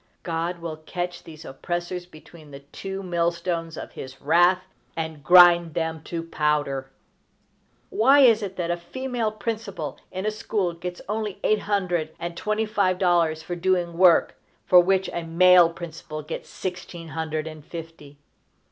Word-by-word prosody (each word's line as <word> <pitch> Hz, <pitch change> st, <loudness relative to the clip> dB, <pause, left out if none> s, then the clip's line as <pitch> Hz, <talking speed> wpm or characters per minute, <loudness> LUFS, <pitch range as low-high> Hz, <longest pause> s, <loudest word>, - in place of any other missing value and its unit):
God 170 Hz, +1 st, -2 dB
will 165 Hz, -2 st, -5 dB
catch 175 Hz, +2 st, -5 dB
these 155 Hz, -1 st, -11 dB
oppressors 175 Hz, +5 st, -4 dB
between 155 Hz, -2 st, -15 dB
the 140 Hz, 0 st, -10 dB
two 195 Hz, +7 st, -7 dB
mill 170 Hz, -2 st, +1 dB
stones 170 Hz, -2 st, -4 dB
of -, -, -7 dB
his 130 Hz, 0 st, -9 dB
wrath, 175 Hz, +5 st, +3 dB, 0.3 s
and 160 Hz, -3 st, -4 dB
grind 175 Hz, -2 st, +7 dB
them 160 Hz, -1 st, -2 dB
to 165 Hz, -1 st, -4 dB
powder! 150 Hz, -4 st, -1 dB, 1.0 s
Why 270 Hz, +6 st, +5 dB
is 230 Hz, -4 st, +6 dB
it 195 Hz, -2 st, -5 dB
that 175 Hz, -2 st, -2 dB
a 175 Hz, -, -1 dB
female 240 Hz, +4 st, -3 dB
principal 210 Hz, -, -5 dB
in 190 Hz, +2 st, -4 dB
a 215 Hz, -, +1 dB
school 210 Hz, -4 st, -2 dB
gets 175 Hz, +1 st, -7 dB
only 210 Hz, -1 st, -3 dB
eight 215 Hz, -, +3 dB
hundred 180 Hz, -7 st, -1 dB
and 170 Hz, 0 st, -5 dB
twenty 215 Hz, +4 st, -1 dB
five 200 Hz, -4 st, +1 dB
dollars 170 Hz, -4 st, +2 dB
for 175 Hz, -, -4 dB
doing 175 Hz, -1 st, 0 dB
work 175 Hz, -1 st, +5 dB, 0.3 s
for 180 Hz, -, +7 dB
which 190 Hz, +1 st, +2 dB
a 170 Hz, -, -2 dB
male 175 Hz, +1 st, +6 dB
principal 160 Hz, -2 st, -8 dB
gets 155 Hz, -, -7 dB
sixteen 175 Hz, -2 st, -6 dB
hundred 155 Hz, 0 st, -3 dB
and 155 Hz, -2 st, -9 dB
fifty? 160 Hz, -3 st, -10 dB
175 Hz, 155 wpm, -24 LUFS, 160-185 Hz, 1.0 s, grind